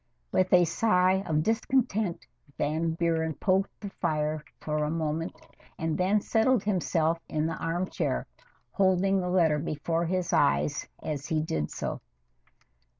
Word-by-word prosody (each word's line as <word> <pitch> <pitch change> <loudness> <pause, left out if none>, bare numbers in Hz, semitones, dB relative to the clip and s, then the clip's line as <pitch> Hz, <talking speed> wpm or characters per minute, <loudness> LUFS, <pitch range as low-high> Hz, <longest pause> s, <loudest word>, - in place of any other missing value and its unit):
With 185 0 +2
a 180 -1 +6
sigh 185 +1 +3
of 155 -2 +1
discontent, 220 -4 0 0.3
Van 160 +3 0
Buren 160 -2 0
poked 190 +4 +1
the 200 -2 -6
fire 155 -3 -1 0.2
for 150 -1 -1
moment 160 0 -2 0.4
and 160 -1 -1
then 195 +4 +2
settled 225 +1 +2
himself 170 -4 +1
in 155 0 0
the 165 - -1
armchair, 175 +3 -2 0.5
holding 195 0 +2
the 180 - -2
letter 165 -5 +3
before 165 +2 -1
his 180 0 -1
eyes 145 0 +2 0.2
as 145 -2 -4
he 160 - +1
did 75 - -2
so. - - -4
170 Hz, 135 wpm, -28 LUFS, 155-190 Hz, 0.5 s, a